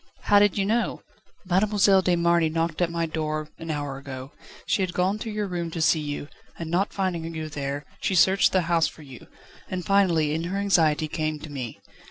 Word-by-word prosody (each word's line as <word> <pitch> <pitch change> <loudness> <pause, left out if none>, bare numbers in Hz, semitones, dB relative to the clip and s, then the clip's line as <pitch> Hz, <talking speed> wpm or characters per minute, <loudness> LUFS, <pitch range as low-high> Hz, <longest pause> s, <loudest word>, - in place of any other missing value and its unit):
"How 205 - +5
did 205 -1 +3
you 195 - +1
know?" 230 +4 0 0.4
"Mademoiselle 195 +1 +4
de 180 -1 +2
Marny 170 -1 +3
knocked 165 +1 -1
at 175 - +2
my 170 0 -1
door 155 -1 -3
an 165 - -7
hour 145 -3 -3
ago. 135 -1 -8 0.3
She - - +1
had 185 -2 -2
gone 190 +4 +1
to 225 - -5
your 210 -1 -2
room 175 -3 -3
to 165 - -5
see 160 0 +3
you, 145 -1 -4 0.3
and, 165 -1 -5
not 190 +4 +1
finding 175 -4 -2
you 155 -1 -4
there, 140 0 -4 0.2
she 190 - 0
searched 190 +3 +5
the 185 - +3
house 165 -1 +2
for 155 - -11
you, 135 -4 -12 0.4
and 185 -2 -4
finally, 170 -7 +3
in 165 +2 -2
her 185 +3 -2
anxiety, 160 -6 +2
came 155 0 -2
to 155 - -8
me. 125 -5 -6
170 Hz, 210 wpm, -25 LUFS, 155-190 Hz, 0.4 s, How